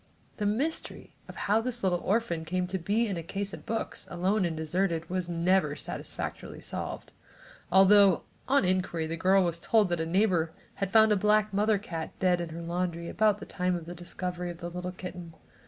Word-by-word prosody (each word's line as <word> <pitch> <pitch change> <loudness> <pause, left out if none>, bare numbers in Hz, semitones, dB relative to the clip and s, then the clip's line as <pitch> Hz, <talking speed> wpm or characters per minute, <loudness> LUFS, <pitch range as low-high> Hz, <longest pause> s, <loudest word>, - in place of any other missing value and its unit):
The 210 - 0
mystery 275 +10 -2
of - - -10
how 210 +3 +1
this 240 -1 -2
little 180 -2 +2
orphan 190 -6 0
came 180 +3 -1
to 190 +1 -3
be 210 +7 +1
in 195 -4 -2
the - - -3
case 195 +4 -4
of - - -10
books, 225 0 -3
alone 185 +3 +1
and 165 -2 -2
deserted, 165 +1 -1
was 180 -1 -2
never 170 -2 +2
satisfactorily - - -6
solved, - - -5 0.6
although 195 0 +6 0.2
on 275 -5 +3
inquiry 180 -3 0
the 160 +1 -3
girl 190 +3 +4
was 170 -1 -1
told 215 +1 +3
that 175 -1 0
a 160 - -2
neighbor 175 -3 +2 0.3
had 195 - 0
found 220 +1 +6
a - - +5
black 210 +1 +2
mother 210 +1 +3
cat 170 -6 -6
dead 180 -2 +2
in 170 - -4
her 165 +1 -7
laundry 170 0 -2
about 215 -1 +3
the 210 - -9
time 180 0 -1
of 170 -2 -5
the 175 - -7
discovery 180 +1 -4
of 170 - -7
the 170 0 -6
little 180 +1 -4
kitten. 180 -2 -8
185 Hz, 200 wpm, -29 LUFS, 170-205 Hz, 0.6 s, although